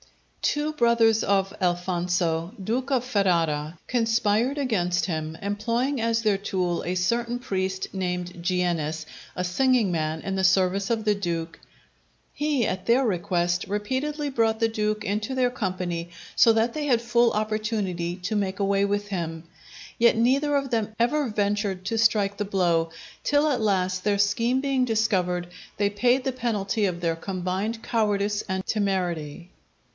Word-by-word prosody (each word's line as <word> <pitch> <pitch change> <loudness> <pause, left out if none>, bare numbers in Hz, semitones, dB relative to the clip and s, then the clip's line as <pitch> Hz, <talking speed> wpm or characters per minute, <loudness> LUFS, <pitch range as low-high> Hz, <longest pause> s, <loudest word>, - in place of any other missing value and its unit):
Two 295 +1 0
brothers 235 -4 +3
of 195 -1 +1
Alfonso, 175 -1 0
Duke 250 +7 -2
of 255 -2 +1
Ferrara, 165 -8 +1
conspired 230 +2 +1
against 180 -10 0
him, 160 -2 -3
employing 230 +6 -1
as 230 0 +1
their 205 -3 +2
tool 185 -4 -1
a 180 - -2
certain 235 +6 0
priest 190 -5 -2
named 180 -2 -3
Giennes, 170 -4 -1 0.3
a 180 - -2
singing 240 +2 +2
man 160 -1 -1
in 195 - -3
the 190 - 0
service 190 +1 +3
of 225 -2 -1
the 210 - +4
Duke. 170 -4 -3 0.7
He, 290 -6 0
at 185 -2 -4
their 250 +3 +4
request, 175 -3 0
repeatedly 265 +9 -2
brought 225 -3 +1
the 225 - +3
Duke 215 -1 -2
into 210 +5 -2
their 250 -1 +2
company, 180 -6 -3 0.3
so 230 - +6
that 225 +1 +1
they 300 -1 -3
had 240 -4 +3
full 235 0 +3
opportunity 210 -5 -2
to 185 +4 -3
make 195 -1 -1
away 200 0 +2
with 205 0 -1
him. 165 -4 -4 0.6
Yet 235 -1 +5
neither 275 +5 +2
of 275 -2 -3
them 220 -2 -1
ever 265 +3 +2
ventured 205 -2 -1
to 225 +3 -1
strike 205 -2 +2
the 210 - -1
blow; 175 -4 +1 0.3
till 290 +1 +3
at 265 -6 +1
last, 185 -3 0
their 205 -1 +2
scheme 230 +5 +2
being 270 -1 +1
discovered, 190 -7 0 0.3
they 200 0 +1
paid 245 +5 +2
the 265 - -1
penalty 220 -4 -1
of 180 -3 -2
their 165 -1 0
combined 190 +5 -3
cowardice 205 -2 0
and 190 0 -2
temerity. 180 -5 -2
205 Hz, 155 wpm, -25 LUFS, 180-230 Hz, 0.7 s, so